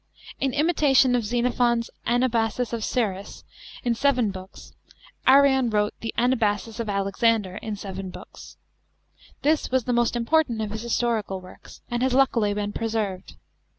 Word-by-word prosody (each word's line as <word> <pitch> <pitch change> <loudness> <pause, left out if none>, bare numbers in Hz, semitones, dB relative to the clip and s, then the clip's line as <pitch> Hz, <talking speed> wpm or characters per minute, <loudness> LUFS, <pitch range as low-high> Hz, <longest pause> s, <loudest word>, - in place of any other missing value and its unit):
(2) - - 0
In 265 - -1
imitation 290 -4 +3
of 240 - 0
Xenophon's 240 +1 0 0.2
Anabasis 240 -1 0
of 230 -2 -2
Cyrus 200 -6 -2 0.4
in 240 - +1
seven 245 -3 +1
Books, 190 0 -11 0.5
Arrian 265 -2 +5
wrote 210 -1 +1
the 225 - -3
Anabasis 230 -2 0
of 230 -2 -3
Alexander 200 0 +1
in 215 -1 -5
seven 195 -1 -6
Books. 180 +1 -12 0.9
This 305 +2 +2
was 260 -1 +1
the 250 - -1
most 240 0 +1
important 240 0 +1
of 215 -1 -3
his 220 0 -5
historical 230 -4 -1
works, 185 0 -14
and 240 0 -1
has 255 0 +1
luckily 240 -6 +3
been 205 0 -3
preserved. 215 -5 -3
230 Hz, 150 wpm, -24 LUFS, 210-250 Hz, 0.9 s, Arrian